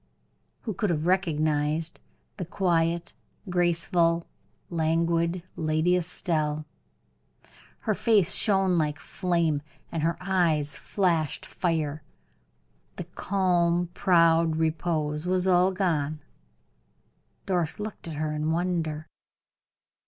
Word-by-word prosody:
Who 220 - -4
could 205 +2 -1
have 160 -2 0
recognized 155 -3 0 0.4
the 180 - -4
quiet, 170 -1 0 0.4
graceful, 170 -1 +2 0.5
languid 170 +1 +1
Lady 155 +3 +1
Estelle? 155 -3 -1 1.2
Her - - 0
face 210 -7 +3
shone 190 -4 +3
like 150 -2 0
flame, 170 -4 0 0.3
and 165 - -2
her 165 +2 0
eyes 170 -6 +1
flashed 170 -7 0
fire 155 -4 -2 0.9
the - - -5
calm, 175 -3 +1
proud 165 -3 +4
repose 160 -1 -1
was 185 0 +1
all 185 0 +4
gone. 155 -6 -1 1.3
Doris 175 -3 -1
looked 210 -4 -6
at 160 - -5
her 155 0 -2
in 150 +1 -1
wonder. 165 -2 -1
170 Hz, 100 wpm, -27 LUFS, 155-180 Hz, 1.3 s, proud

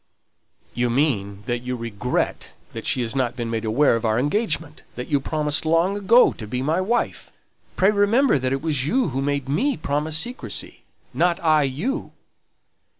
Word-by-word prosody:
"You 120 +1 0
mean 105 -7 0
that 120 -1 -1
you 125 +1 -4
regret 115 0 -3 0.2
that - - -6
she 125 - +1
has 115 +1 -3
not 130 -3 0
been 120 -2 -4
made 115 0 -2
aware 120 +5 +3
of 115 - -3
our 110 -1 +1
engagement 155 - -1
that 125 - -6
you 145 -2 +2
promised 150 +2 0
long 165 +5 +2
ago 210 +5 +5
to 110 - -8
be 125 +4 -3
my 160 +6 +1
wife. 235 +6 -1 0.5
Pray 190 +2 +4
remember 210 - +3
that 130 0 -1
it 135 +1 -2
was 145 -4 +1
you 255 0 +1
who 135 0 -2
made 140 -1 -1
me 245 - 0
promise 150 +2 -1
secrecy, 245 +10 -4 0.3
not 175 0 +1
I 155 -2 +3 0.2
you!" 270 - -3
145 Hz, 175 wpm, -23 LUFS, 125-175 Hz, 0.5 s, ago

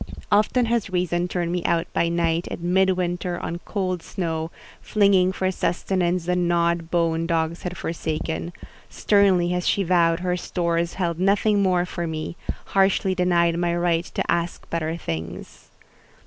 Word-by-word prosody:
Often 215 +4 +3
has 230 -3 0
Reason 180 -1 0
turned 175 -1 -2
me 175 -1 -1
out 170 -1 +1
by 170 - +1
night, 170 0 0
in 175 +1 -3
mid 190 0 +4
winter, 180 -1 -1
on 170 - -4
cold 185 -4 -2
snow, 165 -3 -3 0.3
flinging 200 -3 +3
for 190 0 -1
sustenance 180 -1 -1
the 180 0 +1
gnawed 170 -1 +1
bone 165 -1 +1
dogs 165 0 -1
had 180 0 -5
forsaken: 160 +1 -3 0.4
sternly 195 -4 +3
has 180 0 -1
she 200 - +2
vowed 170 -1 +2
her 180 -1 0
stores 170 -1 -1
held 170 -3 -2
nothing 200 +2 +3
more 180 -2 +2
for 175 -1 -4
me—harshly 190 +4 -1
denied 170 -2 +2
my 175 -1 +1
right 175 -1 +1
to - - -3
ask 170 0 -2
better 165 0 -2
things…. 80 - -6
175 Hz, 150 wpm, -23 LUFS, 170-185 Hz, 0.4 s, mid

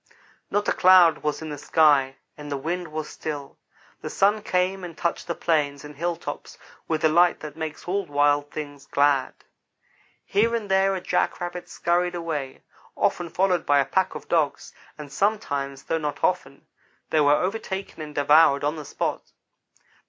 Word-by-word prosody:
Not 205 0 0
a - - +3
cloud 180 -4 +6
was 150 +1 -3
in 160 - -6
the 145 - -6
sky, 145 -4 +3 0.2
and 150 -1 -9
the 140 - -1
wind 170 +5 -3
was 155 0 -5
still. 145 -3 -7 0.4
The - - -5
sun 205 +2 +2
came 185 0 0
and 170 -2 -8
touched 170 - -2
the 170 - -2
plains 145 -3 0
and 150 0 -10
hilltops 170 +2 -5 0.3
with 160 -1 -1
the - - +5
light 175 +3 +3
that 150 -1 -8
makes 160 0 -6
all 195 +1 -1
wild 145 0 +2
things 145 -2 -8
glad. 140 -2 +2 0.9
Here 230 +4 +2
and 210 -4 -4
there 195 0 +3
a 185 - -4
jackrabbit 175 0 -2
scurried 175 +1 0
away, 155 -6 -4 0.3
often 175 -1 0
followed 180 0 +1
by 145 - +3
a 140 - +3
pack 190 +5 0
of - - -8
dogs, 155 -4 0 0.2
and 150 -2 -9
sometimes, 140 -10 -1
though 165 - -1
not 150 -2 -4
often, - - -1 0.5
they 155 - +3
were 145 0 +5
overtaken 190 -1 -3
and 150 -1 -8
devoured 145 0 +5
on 150 +2 -1
the 150 - -7
spot. - - -4
160 Hz, 170 wpm, -24 LUFS, 145-180 Hz, 0.9 s, cloud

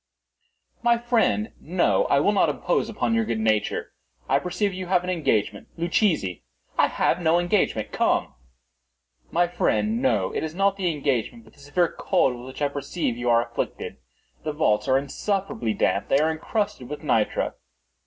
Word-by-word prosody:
"My 235 0 +4
friend, 230 -2 +1
no; 185 - +1
I - - +3
will - - +3
not - - +3
impose - - 0
upon 230 - -1
your 230 0 +2
good 115 - -2
nature. 110 -1 0 0.4
I - - +3
perceive 185 +3 -1
you 185 0 -5
have 180 -1 +2
an 180 - -2
engagement. 110 - 0
Luchesi—" 165 - +1 0.3
"I - - +4
have 180 - 0
no 165 0 +3
engagement;—come." 175 +3 +1 1.0
"My 175 +1 +2
friend, 215 +6 0
no. 265 - +1
It - - -2
is 160 +1 -4
not 195 +1 +2
the 190 -3 0
engagement, 145 - -2
but - - -20
the - - -22
severe 155 +5 0
cold 130 - +2
with 120 +1 -10
which 130 +3 -5
I - - +4
perceive 140 -1 -3
you 120 +1 -2
are 115 0 +4
afflicted. 120 0 -4 0.5
The 155 - -2
vaults 140 -9 +1
are 130 0 +4
insufferably 140 - -2
damp. 100 - +1
They - - +3
are 155 +2 +2
encrusted 200 - -3
with 150 +2 -6
nitre." 110 -7 +1
165 Hz, 170 wpm, -24 LUFS, 130-195 Hz, 1.0 s, My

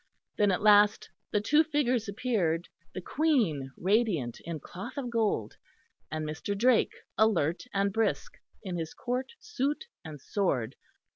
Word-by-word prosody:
Then 205 -1 +3
at 185 - -1
last 210 0 +5 0.2
the 210 - +1
two 295 +9 +4
figures 255 -8 0
appeared, 195 -7 0 0.3
the 185 - -4
Queen 215 - +1
radiant 185 - +1
in 165 -2 -4
cloth 195 - -9
of 250 -4 -3
gold, 215 - 0 0.5
and 155 0 -3
Mr. 160 +6 -3
Drake, 245 +2 +3 0.2
alert 180 -6 +2
and 200 0 0
brisk, 225 -1 -1 0.2
in 185 -4 -4
his 160 -1 -5
Court 255 - -3
suit 300 - -2 0.2
and 155 -4 -8
sword. 135 - -1
205 Hz, 140 wpm, -29 LUFS, 165-245 Hz, 0.5 s, last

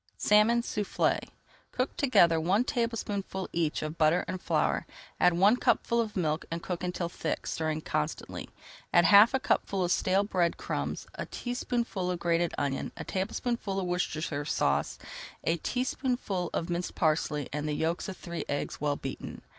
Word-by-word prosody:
SALMON 220 +3 +4
SOUFFLÉ 210 -4 0 0.5
Cook 255 +1 -1
together 170 - +4
one 190 +8 +3
tablespoonful 210 -6 -2
each 165 -3 0
of 155 +2 -5
butter 155 +3 +4
and 185 - -4
flour, - - 0 0.3
add 180 - +5
one 195 +6 +5
cupful 235 -1 +2
of 220 -2 -4
milk, 155 -3 0
and 165 0 -4
cook 180 -1 -4
until 180 -1 -2
thick, 165 -2 -3
stirring 155 -1 -2
constantly. 75 - -3 0.4
Add 175 -1 +5
half 210 +8 +8
a - - +2
cupful 195 -6 0
of 175 - 0
stale 190 +2 +3
bread 180 -4 +1
crumbs, - - -3
a - - -5
teaspoonful 240 -6 -2
of 180 - -1
grated 170 0 +1
onion, 140 -1 -1
a - - -5
tablespoonful 200 +1 -2
of 190 - -2
Worcestershire 160 -4 -1
Sauce, - - 0 0.5
a 165 - +1
teaspoonful 245 - -1
of 165 - -2
minced 175 0 -3
parsley, 155 -3 +1
and 150 +1 -2
the 150 - -1
yolks 165 +6 -1
of 190 - -7
three 170 -1 -5
eggs, 145 -1 -3
well 145 -1 +1
beaten. 135 -1 -7
180 Hz, 160 wpm, -29 LUFS, 165-210 Hz, 0.5 s, half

